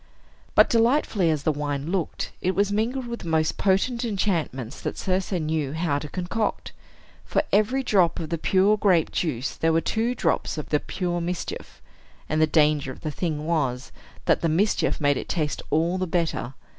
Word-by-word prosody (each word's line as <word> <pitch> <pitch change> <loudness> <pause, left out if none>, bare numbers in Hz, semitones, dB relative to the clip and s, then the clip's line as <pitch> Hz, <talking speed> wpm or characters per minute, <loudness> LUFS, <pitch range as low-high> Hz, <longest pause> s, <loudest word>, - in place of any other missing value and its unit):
But, - - +7
delightfully 230 - +2
as 155 -3 0
the 155 - +2
wine 145 +1 -3
looked, 185 -4 -2
it 185 +1 0
was 200 +1 +2
mingled 235 +5 -1
with 235 0 -5
the - - -8
most 160 -1 +1
potent 220 +6 +1
enchantments 170 - -2
that - - -4
Circe 185 +1 -1
knew 155 -4 -1
how 160 -3 0
to 150 - -7
concoct. 190 +5 -2 0.5
For - - 0
every 225 +6 +2
drop 185 -8 +3
of 160 - -4
the 165 -1 -2
pure 195 +5 +3
grape 185 -6 +3
juice 140 -7 -2
there 165 - +1
were 165 - +3
two 230 +7 -1
drops 165 -5 0
of 150 - -5
the 150 - +2
pure 175 0 -3
mischief; 175 +1 -5 0.4
and 155 0 0
the 155 - +5
danger 150 -3 +2
of - - -12
the 155 - -3
thing 155 -1 -3
was, 135 -6 -1 0.3
that - - +3
the 165 - +1
mischief 195 +7 +1
made 145 -3 +2
it - - -6
taste 155 -5 -1
all 170 +4 +1
the 185 - -1
better. 165 -7 -1
170 Hz, 185 wpm, -25 LUFS, 155-195 Hz, 0.5 s, But